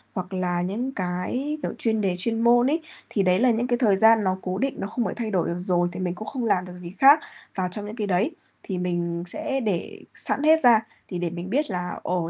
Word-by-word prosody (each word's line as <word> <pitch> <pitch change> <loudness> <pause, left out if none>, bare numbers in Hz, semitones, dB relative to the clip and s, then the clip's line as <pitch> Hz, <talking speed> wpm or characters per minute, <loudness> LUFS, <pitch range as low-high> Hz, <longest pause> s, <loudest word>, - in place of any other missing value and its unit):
hoặc 185 0 -4
là 180 -1 -1
những 225 +9 -2
cái, 200 +10 -3
kiểu, - - -2
chuyên 220 -2 0
đề 185 -3 0
chuyên 225 +4 -1
môn 240 +1 +5
ấy. 325 +1 0 0.3
Thì 200 - +1
đấy 185 +1 +3
là 250 0 +4
những 235 +2 0
cái 240 -1 +1
thời 210 -6 +3
gian 220 0 +6
nó 185 0 0
cố 185 +1 -3
định, 270 +1 -1
nó - - -3
không 235 +2 -2
phải - - -2
thay 225 -2 -3
đổi 185 -4 +1
được 170 +1 -3
rồi, 175 -1 +1
thì - - -7
mình 180 -1 -2
cũng 215 - -8
không 255 -4 -3
làm 185 -4 +1
được 180 0 -10
gì 175 -1 -8
khác 280 +3 +8 0.4
vào 185 -1 0
trong 205 +2 -5
những 210 +2 -7
cái 210 -3 -3
đấy. 195 - +1 0.3
Thì 190 -3 -4
mình 175 -1 -2
sẽ 295 - -2
để 200 -6 -2
sẵn 280 - -2
hết 320 0 +5
ra 235 -3 +7 0.3
thì 180 - -4
để 175 -1 -1
mình 175 +2 -6
biết 285 +6 0
là 180 -2 -4
ồ, 175 -2 -1
200 Hz, 260 wpm, -24 LUFS, 180-240 Hz, 0.4 s, khác